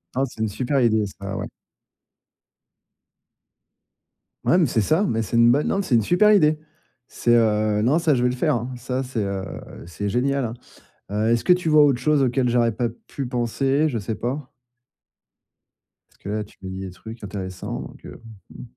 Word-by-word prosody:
Ah! 135 Hz, -, +1 dB
C'est 115 Hz, -, -10 dB
une 110 Hz, -, +1 dB
super 130 Hz, +6 st, -1 dB
idée 110 Hz, -3 st, +3 dB
ça, 100 Hz, 0 st, -5 dB
ouais. -, -, -4 dB, 3.0 s
Ouais 175 Hz, -, +4 dB
mais 175 Hz, -, +4 dB
c'est 115 Hz, -5 st, +1 dB
ça, 160 Hz, -, +2 dB
mais 115 Hz, -7 st, 0 dB
c'est 110 Hz, +2 st, -2 dB
une 115 Hz, 0 st, +6 dB
bonne 145 Hz, +3 st, +1 dB
non 195 Hz, -, +1 dB
c'est 130 Hz, -, +1 dB
une 115 Hz, -, +4 dB
super 180 Hz, -, +4 dB
idée. 155 Hz, -6 st, +4 dB, 0.5 s
C'est, 120 Hz, -, 0 dB
heu 110 Hz, -2 st, +2 dB
non, 130 Hz, +8 st, +3 dB
ça 165 Hz, -3 st, +2 dB
je 125 Hz, -, +1 dB
vais 125 Hz, -, +3 dB
le 125 Hz, -, -2 dB
faire, 125 Hz, -, +1 dB
hein, 120 Hz, +2 st, -4 dB
ça 125 Hz, +2 st, -3 dB
c'est, 125 Hz, -5 st, -3 dB
heu, 100 Hz, -1 st, -3 dB, 0.4 s
c'est 90 Hz, +4 st, -4 dB
génial, 135 Hz, +5 st, 0 dB
hein. 115 Hz, -, -4 dB, 0.6 s
Heu, 105 Hz, +2 st, 0 dB
est-ce 115 Hz, -1 st, +1 dB
que -, -, +5 dB
tu 180 Hz, -2 st, +1 dB
vois 150 Hz, -1 st, +6 dB
autre 140 Hz, -4 st, +3 dB
chose 150 Hz, +2 st, +2 dB
auquel 125 Hz, 0 st, +1 dB
j'aurais 120 Hz, -1 st, +2 dB
pas 120 Hz, +2 st, -1 dB, 0.2 s
pu 140 Hz, -, -5 dB
penser? 135 Hz, +5 st, 0 dB
Je 115 Hz, -, -2 dB
sais 110 Hz, +2 st, -4 dB
pas 130 Hz, +5 st, -4 dB, 1.6 s
parce -, -, -28 dB
que 100 Hz, -, -8 dB
là, 105 Hz, 0 st, -2 dB
tu 105 Hz, -, -19 dB
me 95 Hz, -, -5 dB
dis 95 Hz, 0 st, -6 dB
des 95 Hz, -1 st, -6 dB
trucs 110 Hz, +5 st, -11 dB
intéressants 95 Hz, -2 st, -5 dB
donc -, -, -12 dB
heu, -, -, -11 dB, 0.3 s
mmh. -, -, -10 dB
120 Hz, 200 wpm, -23 LUFS, 110-140 Hz, 3.0 s, une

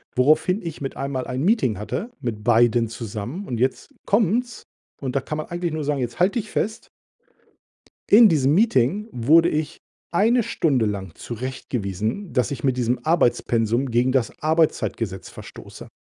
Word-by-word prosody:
woraufhin 155 Hz, -, +3 dB
ich 165 Hz, -4 st, -7 dB
mit 135 Hz, -, -5 dB
einmal 135 Hz, -1 st, -3 dB
ein 130 Hz, +2 st, -3 dB
Meeting 180 Hz, -, +2 dB
hatte 210 Hz, -, -4 dB
mit 115 Hz, -5 st, -4 dB
beiden 120 Hz, 0 st, +3 dB
zusammen 115 Hz, -, -6 dB
und 120 Hz, -3 st, -3 dB
jetzt 130 Hz, +2 st, -1 dB
kommt's 230 Hz, +4 st, 0 dB, 0.4 s
und 135 Hz, -1 st, -4 dB
da 140 Hz, -, +2 dB
kann 150 Hz, -, -5 dB
man 155 Hz, -, -5 dB
eigentlich 175 Hz, -1 st, -3 dB
nur 155 Hz, -1 st, -3 dB
sagen: 145 Hz, -1 st, -1 dB
„Jetzt 120 Hz, -2 st, -4 dB
halt 185 Hz, +5 st, +2 dB
dich 215 Hz, -3 st, -2 dB
fest!“ 220 Hz, +2 st, -3 dB, 1.2 s
In 220 Hz, +2 st, +8 dB
diesem 145 Hz, -5 st, +2 dB
Meeting 200 Hz, -, +2 dB
wurde 155 Hz, +8 st, +4 dB
ich 155 Hz, -2 st, -2 dB, 0.3 s
1 225 Hz, +8 st, +3 dB
Stunde 140 Hz, -, +1 dB
lang 95 Hz, -5 st, -4 dB
zurechtgewiesen, 120 Hz, -, -4 dB
dass 125 Hz, +3 st, +1 dB
ich 140 Hz, -4 st, -5 dB
mit 130 Hz, -2 st, +1 dB
diesem 125 Hz, 0 st, 0 dB
Arbeitspensum 120 Hz, -6 st, +1 dB
gegen 120 Hz, +2 st, +2 dB
das 130 Hz, -3 st, +1 dB
Arbeitszeitgesetz 155 Hz, -, 0 dB
verstoße. -, -, -11 dB
135 Hz, 155 wpm, -23 LUFS, 120-170 Hz, 1.2 s, In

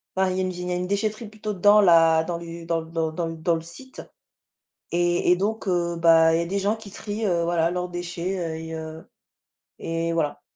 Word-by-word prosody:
bah 190 Hz, 0 st, +2 dB
il 185 Hz, -, -2 dB
y -, -, 0 dB
a -, -, +1 dB
une 185 Hz, -, -1 dB
vi 180 Hz, 0 st, -7 dB
il 180 Hz, -, -4 dB
y -, -, -2 dB
a -, -, 0 dB
une 180 Hz, 0 st, -2 dB
déchetterie 215 Hz, +3 st, -2 dB
plutôt 215 Hz, 0 st, -5 dB
dans 205 Hz, +2 st, +5 dB
la 165 Hz, -3 st, +5 dB
dans 170 Hz, 0 st, -3 dB
l'u 170 Hz, 0 st, -8 dB
dans 165 Hz, 0 st, 0 dB
l -, -, -15 dB
dans 160 Hz, -1 st, -1 dB
dans 165 Hz, +1 st, -3 dB
dans 165 Hz, +1 st, 0 dB
le 165 Hz, -, -4 dB
site 260 Hz, +11 st, -10 dB, 0.9 s
et 175 Hz, 0 st, +2 dB
et 180 Hz, -, +6 dB
donc, 210 Hz, +3 st, -2 dB
heu, 175 Hz, -2 st, 0 dB
bah 165 Hz, -1 st, +5 dB
il -, -, +2 dB
y -, -, +1 dB
a -, -, -5 dB
des 195 Hz, +4 st, -2 dB
gens 200 Hz, +2 st, +1 dB
qui 220 Hz, -3 st, -12 dB
trient, 210 Hz, +2 st, -4 dB
heu, 175 Hz, -4 st, +1 dB
voilà 170 Hz, 0 st, +1 dB
leurs 180 Hz, 0 st, -3 dB
déchets, 175 Hz, +1 st, -4 dB
heu 165 Hz, -2 st, -3 dB
et 160 Hz, 0 st, -6 dB
heu, 160 Hz, 0 st, -8 dB, 0.7 s
et 165 Hz, 0 st, -2 dB
voilà. 155 Hz, -3 st, -1 dB
175 Hz, 250 wpm, -24 LUFS, 165-190 Hz, 0.9 s, et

